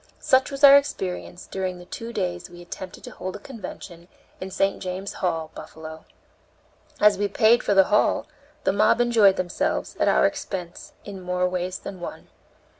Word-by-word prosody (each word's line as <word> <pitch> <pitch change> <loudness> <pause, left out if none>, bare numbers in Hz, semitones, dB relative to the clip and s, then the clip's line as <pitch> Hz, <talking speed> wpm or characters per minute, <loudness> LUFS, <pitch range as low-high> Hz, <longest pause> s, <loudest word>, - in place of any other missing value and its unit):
Such 260 0 +3
was 275 0 -7
our 280 0 +11
experience 185 -10 -3
during 185 -1 -4
the 180 - -12
two 230 +5 -7
days 180 -5 -3
we 175 0 -13
attempted 180 +1 -9
to - - -9
hold 185 +1 -6
a - - -7
convention 195 -7 -9 0.3
in 190 - -5
St. 195 +1 0
James' 185 +1 -4
Hall, 165 -3 -1
Buffalo. 160 0 -10 0.9
As 210 -2 +5
we 205 - +1
paid 220 +4 +4
for 205 - +1
the 195 - +8
hall, 210 - +3 0.4
the - - +2
mob 215 +3 +3
enjoyed 225 -5 +5
themselves, 180 -1 -2
at - - +2
our - - +4
expense, 195 - -4
in 195 -2 -8
more 180 0 0
ways 180 0 -3
than 190 -2 -8
one. 175 - -8
190 Hz, 175 wpm, -24 LUFS, 180-210 Hz, 0.9 s, our